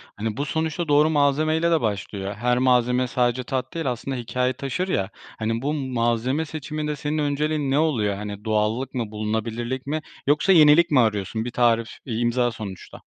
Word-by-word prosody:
Hani, 110 +3 -3
bu 145 - -1
sonuçta 160 +3 -2
doğru 150 +2 +4
malzemeyle 155 +3 +2
de 160 - +3
başlıyor. 100 -2 -3
Her 125 +2 +1
malzeme 125 0 +3
sadece 125 0 0
tat 130 +4 -3
değil, 165 -6 -1
aslında 130 +3 -4
hikâye 125 +2 -1
taşır, 140 +8 -3
ya, 100 - -1 0.3
hani, 115 +1 -1
bu 145 +3 -1
malzeme 130 +1 0
seçiminde 150 0 -4
senin 145 +1 -3
önceliğin 150 -1 0
ne 140 - +3
oluyor? 115 -11 +1
Hani, 105 +1 -7
doğallık 110 +5 0
mı, 115 -4 -3
bulunabilirlik 110 +4 -3
mi 155 +2 -1 0.3
yoksa 150 +6 +3
yenilik 160 -1 +6
mi 140 - +5
arıyorsun? 110 -1 0
Bir 120 - -4
tarif, 115 -1 +2 0.2
bir 115 -3 -3
imza 120 +1 +1
sonuçta. 105 -5 -9
125 Hz, 175 wpm, -23 LUFS, 115-150 Hz, 0.3 s, yenilik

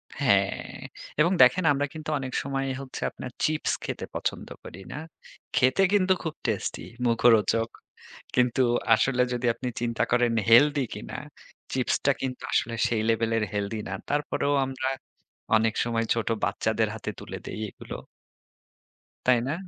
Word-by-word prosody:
হ্যাঁ। - - +1 0.4
এবং 165 +4 +5
দেখেন 125 +9 +4
আমরা 140 +1 0
কিন্তু 155 -1 -6
অনেক 130 -1 -5
সময় 135 0 -2 0.2
হচ্ছে 135 -1 -8
আপনার 125 - -8
চিপস 155 0 0
খেতে - - -4
পছন্দ - - -2 0.2
করি। 90 - -10
না? - - -5 0.6
খেতে 130 +6 +4
কিন্তু 190 -2 +4
খুব 160 -3 -3
টেস্টি, 110 -4 -2 0.2
মুখরোচক। 115 -2 +4 0.7
কিন্তু 125 +1 +3 0.3
আসলে 125 +3 +3
যদি 125 0 -2
আপনি 125 +1 -4
চিন্তা 115 -1 0
করেন 120 -1 +3 0.2
হেলথি 145 +4 +6
কিনা, - - -7 0.6
চিপসটা 130 +2 +2
কিন্তু 130 -1 -3
আসলে 115 +1 +1
সেই 110 -2 0
লেভেলের 115 -1 +1
হেলথি 105 +2 -2
না। 95 - -3 0.2
তারপরেও 145 0 0
আমরা 130 0 -2 0.7
অনেক 110 0 +3
সময় 115 -1 0
ছোট 115 -1 -2 0.2
বাচ্চাদের - - +1
হাতে - - -4
তুলে - - -7
দেই - - -5
এগুলো। - - -8 1.3
তাই 125 -1 +5
না? 140 - 0
125 Hz, 140 wpm, -27 LUFS, 115-140 Hz, 1.3 s, হেলথি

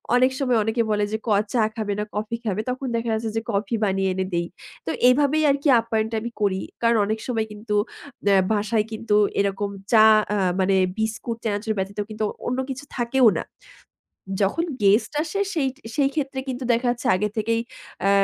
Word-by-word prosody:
অনেক 255 +1 +4
সময় 250 -4 +2
অনেকে 225 +2 0
বলে 210 0 +1
যে, 220 - 0
ক - - 0 0.2
চা 240 - +3
খাবে 215 -3 -2
না - - 0
কফি 215 +2 -2
খাবে, 210 0 0
তখন 255 +1 -3
দেখা 230 0 -1
যাচ্ছে 220 0 -1
যে - - +1
কফি 205 +2 -1
বানিয়ে 195 -1 +1
এনে 190 0 -1
দেই। 170 0 0 0.4
তো - - -3 0.2
এভাবেই 290 +4 +3
আরকি 280 +2 -1
আপ্যায়নটা 225 -1 -1
আমি 235 +1 -5
করি। 190 -2 +1 0.2
কারণ, 230 -1 +3
অনেক 220 +2 -2
সময় 225 -3 0
কিন্তু 210 0 -4 0.5
নে 200 - +5 0.2
বাসায় 215 0 +1
কিন্তু 220 -1 -1 0.2
এরকম 200 0 0 0.2
চা 220 -2 +7 0.3
আ - - +1 0.2
মানে 190 +1 +3 0.2
বিস্কুট, 225 +1 -2
চানাচুর 215 +1 -1
ব্যতীত 195 +2 -3
কিন্তু 215 0 -4 0.2
অন্য 250 +2 -1
কিছু 270 +2 -5
থাকেও 240 +1 +3
না। - - -2 1.0
যখন 200 +12 +1 0.2
গেস্ট 200 +3 +4
আসে 335 +5 -4
সেই 300 -6 +1 0.3
সেইক্ষেত্রে 275 -1 0
কিন্তু 255 0 -4
দেখা 240 +2 0
যাচ্ছে 240 - -4
আগে 210 +3 0
থেকেই 230 +1 +1 0.5
আ - - +4
225 Hz, 180 wpm, -23 LUFS, 210-250 Hz, 1.0 s, চা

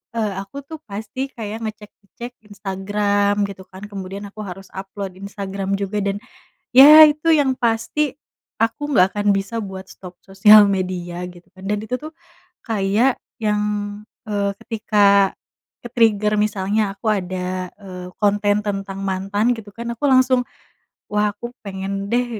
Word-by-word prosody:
e - - -1 0.2
aku 200 +8 -11
tuh 320 - -7
pasti 215 +5 -7 0.2
kayak 220 -1 -5
ngecek-ngecek 215 +2 -8 0.2
Instagram 205 0 0 0.2
gitu 190 -1 -9
kan 190 +2 -11
kemudian 195 0 -6
aku 215 - -15
harus 195 +2 -9
upload 195 0 -6
Instagram 195 -1 -5
juga 200 +1 -2
dan 200 0 -1 0.6
ya 305 +4 +11
itu 300 +2 -1
yang 265 -2 +2
pasti 235 +5 0 0.6
aku 230 +5 -1
nggak 185 -8 +5
akan 205 0 -1
bisa 195 +4 -4
buat 190 -1 -8
stop 180 -1 -12
sosial 205 +2 +7
media 180 -1 -4
gitu 175 0 -17
kan 190 - -13
dan 210 0 0
itu 220 +4 -3
tuh 310 - -7 0.6
kayak 220 +4 +2 0.2
yang, 210 -1 +1 0.7
eee, 200 -1 0
ketika 200 -3 +3 0.5
ke-trigger 220 -3 +2
misalnya 210 0 0
aku 205 +2 -7
ada, 185 0 -4
eee, 180 -2 -8
konten 205 0 +2
tentang 195 -1 -3
mantan 195 +3 -1
gitu 215 -2 -10
kan 235 0 -5
aku 230 - -14
langsung, 255 -1 +4 0.7
"Wah 210 0 +1
aku 215 - -9 0.2
pengen 195 +1 -4
deh, 245 +1 +2
205 Hz, 140 wpm, -21 LUFS, 195-220 Hz, 0.7 s, ya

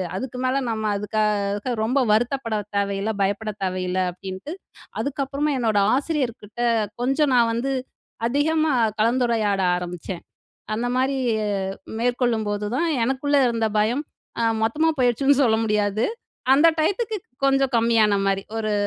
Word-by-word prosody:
அதுக்கு 250 +5 -5
மேல 255 +1 +1
நம்ம 220 -1 -2
அதுக்காக 210 +1 -1
ரொம்ப 255 +5 +1
வருத்தப்பட 235 +1 +1 0.2
தேவையில்ல, 200 +1 0
பயப்பட 205 +2 0
தேவையில்ல 185 0 -1
அப்டின்ட்டு 190 - -8 0.5
அதுக்கப்பறமா 280 +1 -1
என்னோடய 210 -4 +2
ஆசிரியர்கிட்ட 255 -7 -3 0.4
கொஞ்சம் 270 +3 +2
நான் 235 -2 +4
வந்து 245 +4 -1 0.6
அதிகமா 310 +4 +1 0.3
கலந்துரையாட 225 -4 +2 0.2
ஆரம்பிச்சேன். 180 0 -6 0.5
அந்த 235 +3 -2
மாரி 265 +2 +1 0.8
மேற்கொள்ளும்போதுதான் 235 +2 0 0.2
எனக்குள்ள 270 +3 0
இருந்த 230 -1 0
பயம் 230 +7 +1 0.4
அ - - +1 0.2
மொத்தமா 300 +9 +2
போயிடுச்சுன்னு 270 +3 +3
சொல்ல 220 -2 +3
முடியாது. 210 0 +1 0.5
அந்த 300 +4 +6
டையத்துக்கு 420 +6 0 0.3
கொஞ்சம் 270 -1 +2
கம்மியான 225 -3 +3
மாரி, 195 0 0
ஒரு 215 -1 -1
230 Hz, 115 wpm, -23 LUFS, 205-270 Hz, 0.8 s, அந்த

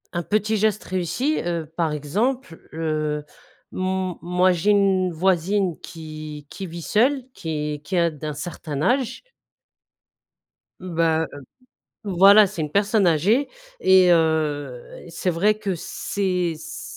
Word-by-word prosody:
Un 175 0 -2
petit 215 +3 0
geste 215 0 +1
réussi, 185 - -1
heu, 170 -2 -2
par 165 -3 0
exemple, 190 - -2
heu, 155 -2 -2 0.5
m 185 -1 -2
moi 180 +1 +2
j'ai 180 +4 +2
une 190 -3 +2
voisine 185 +1 +1
qui 155 -2 -9
qui 195 - -7
vit 170 0 -7
seule, 255 - +2
qui 150 -3 -4
qui 190 - -3
a 170 -1 +3
d'un 150 0 -6
certain 150 -1 -5
âge 255 - 0 1.6
bah, 165 -2 0
heu, 145 - -10 0.6
voilà, 200 +2 +7
c'est 190 -3 -7
une 150 -1 -2
personne 200 +2 +2
âgée 195 - +2 0.3
et 185 -1 +6
heu, 150 -6 -1
c'est 170 +2 -2
vrai 195 +6 +2
que 195 -3 -2
ses 180 0 -2
s 155 - -9
175 Hz, 130 wpm, -23 LUFS, 160-200 Hz, 1.6 s, voilà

